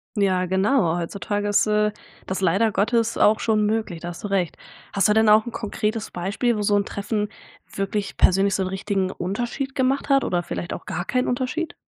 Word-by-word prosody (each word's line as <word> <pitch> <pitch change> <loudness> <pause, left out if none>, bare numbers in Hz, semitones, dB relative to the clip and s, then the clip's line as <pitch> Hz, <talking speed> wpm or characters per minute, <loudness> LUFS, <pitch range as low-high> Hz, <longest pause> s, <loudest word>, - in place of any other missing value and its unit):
Ja, 185 -3 +2
genau. 190 -2 +2
Heutzutage 205 +4 -3
ist, 205 - +3
äh, 210 0 +2 0.4
das 190 - -2
leider 195 +5 +2
Gottes 230 +3 +1
auch 215 +1 +4
schon 215 -2 +2
möglich. 210 -5 -1
Da 175 - -5
hast 175 - -9
du - - -2
recht. 190 -4 -1 0.4
Hast 200 - +3
du - - +5
denn 220 0 +4
auch 215 +2 +5
'n - - -4
konkretes 215 0 -3
Beispiel 200 +7 -1
wo 210 - -2
so 205 0 +2
'n 200 0 +2
Treffen 210 +1 -2 0.4
wirklich 195 +1 -2
persönlich 195 +1 +3
so 195 - 0
'n 185 - 0
richtigen 190 -1 -1
Unterschied 240 +9 -3
gemacht 270 +2 0
hat, 275 -1 +4
oder 175 -1 0
vielleicht 175 - -5
auch - - -8
gar 175 - -4
keinen 250 +4 0
Unterschied? 260 +7 -2
205 Hz, 200 wpm, -23 LUFS, 190-225 Hz, 0.4 s, du